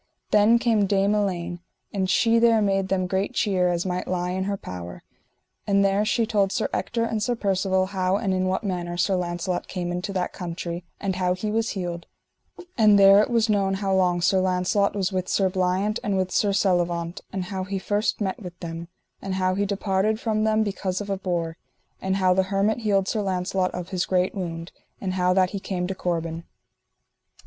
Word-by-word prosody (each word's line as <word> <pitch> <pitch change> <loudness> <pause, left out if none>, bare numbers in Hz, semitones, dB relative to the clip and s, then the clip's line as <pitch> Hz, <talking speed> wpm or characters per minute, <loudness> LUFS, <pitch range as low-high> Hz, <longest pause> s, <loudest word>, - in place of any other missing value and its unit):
Then 210 +3 +5
came 225 -4 +2
Dame 200 +1 +2
Elaine 180 -4 -1 0.3
and 190 -2 -1
she 230 +3 +4
there 230 -1 +5
made 195 -2 +1
them 190 -1 0
great 190 +6 -2
cheer 185 -4 +2
as 175 0 -1
might 180 -1 -2
lie 180 0 -1
in 190 +1 -2
her 200 0 -2
power; 90 - -8 0.6
and 200 -1 +3
there 195 +1 +2
she 230 +2 +1
told 205 -3 +1
Sir 220 - 0
Ector 230 -1 -1
and 225 -2 -1
Sir 240 +3 0
Percivale 190 -3 +1
how 185 -1 0
and 200 -3 -1
in 185 0 0
what 190 +4 -1
manner 175 -3 -3
Sir 185 +2 +2
Launcelot 175 0 -2
came 175 -2 -3
into 180 +3 -3
that 185 -2 -2
country, 170 0 -5 0.2
and 190 -2 -2
how 180 -1 +1
he 210 +3 -3
was 225 +1 0
healed; 175 -2 -4 0.7
and 210 -2 +6
there 195 +1 +8
it - - 0
was 230 -1 +2
known 200 -2 +1
how 195 0 -1
long 180 -2 +2
Sir 190 +2 +3
Launcelot 185 +2 +1
was 195 -1 0
with 185 -1 -2
Sir 190 -2 +2
Bliant 185 +4 0
and 200 -2 0
with 185 -1 -1
Sir 205 - +2
Selivant, 175 -2 0
and 190 -1 -3
how 190 0 -4
he 195 +1 -3
first 205 +3 -1
met 195 0 -2
with 180 -2 -9
them, 165 0 -6 0.3
and 195 -1 -3
how 185 0 +1
he 200 +1 0
departed 200 +2 0
from 215 -2 0
them 220 0 +3
because 195 -2 -2
of 205 -1 -5
a 195 - 0
boar; 170 -3 -2 0.4
and 190 0 0
how 185 -1 +3
the 190 - +3
hermit 205 +3 +1
healed 200 -4 +1
Sir 215 - 0
Launcelot 185 -1 0
of 180 0 -5
his 185 -2 -1
great 185 0 +1
wound, 170 -3 -5 0.3
and 185 -2 -3
how 180 -1 +2
that 185 -1 +2
he 200 - -3
came 185 -2 -3
to 190 - -2
Corbin. 165 -2 -3
190 Hz, 205 wpm, -24 LUFS, 180-205 Hz, 0.7 s, there